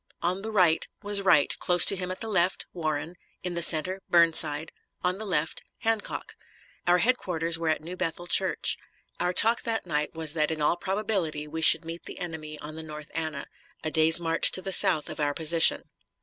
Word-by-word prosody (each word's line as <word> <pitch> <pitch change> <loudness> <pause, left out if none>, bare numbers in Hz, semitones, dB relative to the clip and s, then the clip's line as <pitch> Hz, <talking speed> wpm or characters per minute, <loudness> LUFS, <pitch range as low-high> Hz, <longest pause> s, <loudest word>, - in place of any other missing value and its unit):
On 180 +3 -1
the 220 - -6
right 180 -6 +2 0.2
was 205 -1 +2
Wright; 165 -7 +4
close 180 -1 +5
to - - +4
him 185 -1 -5
at 185 - -7
the 225 - -4
left, 185 -3 0
Warren; 160 0 -4 0.3
in 180 -1 -4
the 170 - -3
center, 175 +4 +2
Burnside; 160 -2 +2 0.3
on 180 +2 -1
the 220 - -5
left, 160 -3 -2 0.2
Hancock. 225 -2 -2 0.5
Our 175 0 +4
headquarters 175 -7 0
were 165 -1 -1
at 155 - -1
New 175 +3 -7
Bethel 175 -1 -4
Church. - - +1 0.4
Our 180 +1 0
talk 225 +5 +4
that 225 -3 -3
night 150 -2 -2
was 160 -2 -1
that 155 -2 0
in 160 -1 -4
all 150 +3 +2
probability 190 -6 -2
we 160 +2 -6
should 160 +1 +6
meet 165 +1 -7
the - - -9
enemy 160 -3 -7
on 150 +1 -8
the - - -6
North 150 -1 -10
Anna, 155 -3 -4 0.4
a 155 - -3
day's 160 +1 +5
march 165 -1 +3
to 185 - 0
the 195 - -2
south 155 - +3
of - - -8
our 145 -1 -1
position. 165 +1 +3
170 Hz, 200 wpm, -26 LUFS, 155-185 Hz, 0.5 s, should